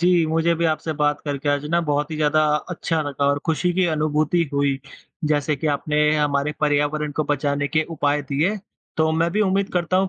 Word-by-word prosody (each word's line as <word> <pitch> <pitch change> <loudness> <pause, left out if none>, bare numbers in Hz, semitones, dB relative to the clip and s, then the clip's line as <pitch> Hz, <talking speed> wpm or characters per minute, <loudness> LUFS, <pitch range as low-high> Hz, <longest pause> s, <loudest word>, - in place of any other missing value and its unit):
जी, 175 -2 +3
मुझे 165 +1 +1
भी 170 - -1
आपसे 155 +1 -2
बात 150 -1 0
करके 145 0 -3
आज 145 0 +1
ना 170 0 +3
बहुत 150 -1 -1
ही 155 - -4
ज़्यादा 155 0 +2 0.3
अच्छा 165 -2 -1
लगा 140 -1 -2
और 140 0 +2
खुशी 175 +2 +1
की 185 -1 +2
अनुभूति 155 +2 +1
हुई 140 -1 +1 0.5
जैसे 145 0 +1
कि 155 - -3
आपने 150 +1 -1 0.2
हमारे 145 0 0
पर्यावरण 145 0 0
को 155 +1 -1
बचाने 145 0 -1
के 155 0 +1
उपाय 145 -2 0
दिए। 165 +10 +1 0.4
तो 160 0 +2
मैं 165 +1 +1
भी 210 - +1
उम्मीद 195 0 0
करता 180 +1 0
हूँ 190 0 +2
150 Hz, 200 wpm, -22 LUFS, 145-165 Hz, 0.5 s, जी